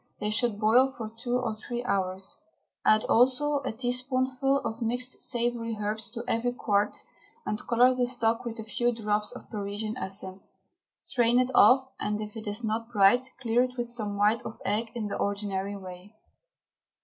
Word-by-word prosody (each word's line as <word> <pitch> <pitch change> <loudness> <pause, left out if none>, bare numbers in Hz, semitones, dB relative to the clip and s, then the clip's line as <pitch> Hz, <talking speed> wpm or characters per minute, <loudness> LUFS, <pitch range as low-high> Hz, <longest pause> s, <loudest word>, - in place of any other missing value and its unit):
They 210 0 -1
should 225 -1 +1
boil 245 +5 +5
for 220 -2 -5
two 245 0 0
or 235 -4 -2
three 240 +2 -4
hours. 190 -4 -2 0.4
Add 215 0 +4
also 265 +5 +3
a 270 -1 -3
teaspoonful 255 +3 0
of 225 +2 -4
mixed 245 +2 -3
savoury 235 -2 -1
herbs 215 +2 -2
to 235 -1 -5
every 245 +2 0
quart, 205 -4 0 0.4
and 210 - -2
colour 245 +2 +5
the 250 -1 +1
stock 235 -2 +1
with 235 -1 -5
a 220 - -5
few 240 +3 0
drops 210 -2 -1
of 250 - -11
Parisian 210 +2 -3
essence. 190 -1 -4 0.4
Strain 240 0 +2
it 255 +1 +2
off, 265 +2 +6
and, 210 0 -1
if 210 0 -6
it 220 -1 -7
is 205 +3 -2
not 225 +2 -2
bright, 225 +4 +5 0.2
clear 235 +1 +3
it 250 0 -2
with 240 -1 -2
some 215 -4 -3
white 210 +3 +3
of - - -8
egg 220 +3 0
in 230 -3 -2
the 205 - -3
ordinary 200 -1 -2
way. 185 +2 -11
230 Hz, 175 wpm, -28 LUFS, 210-245 Hz, 0.4 s, off